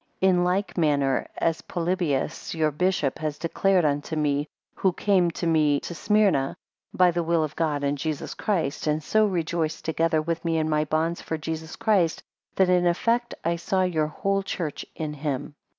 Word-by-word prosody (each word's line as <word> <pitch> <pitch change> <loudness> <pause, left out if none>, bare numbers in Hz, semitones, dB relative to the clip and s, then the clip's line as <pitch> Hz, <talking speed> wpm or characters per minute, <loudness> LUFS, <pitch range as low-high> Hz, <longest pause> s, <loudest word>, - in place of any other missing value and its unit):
3 190 - +4
In 180 -1 +3
like 185 +1 0
manner 140 -4 +2
as 165 -1 0
Polybius 170 -5 -2
your 155 -1 +2
bishop 155 -3 0
has 155 -2 -3
declared 180 +1 +2
unto 145 +2 -1
me, 145 -1 0 0.3
who 190 -2 +1
came 185 -3 +2
to 170 - -4
me 155 -3 +3
to - - -6
Smyrna, 195 -8 +2 0.3
by 180 -1 +4
the 175 0 -1
will 165 -1 +1
of 150 -1 -4
God 150 -3 0
and 140 0 0
Jesus 155 -1 -3
Christ, 160 -8 -1
and 150 +1 0
so 215 +6 +3
rejoiced 165 -3 -2
together 160 0 +1
with 165 +1 -2
me 165 -1 0
in 155 -1 +1
my 155 -1 +1
bonds 160 +3 -1
for 160 - -3
Jesus 160 +1 -5
Christ, 185 -7 +1 0.3
that 190 - +4
in 180 -1 +3
effect 235 +7 +1
I 170 +1 +1
saw 185 +2 0
your 160 -4 +1
whole 195 +5 -1
church 170 -5 -4
in 155 -2 -4
him. 145 -1 -3
165 Hz, 180 wpm, -25 LUFS, 150-180 Hz, 0.3 s, 3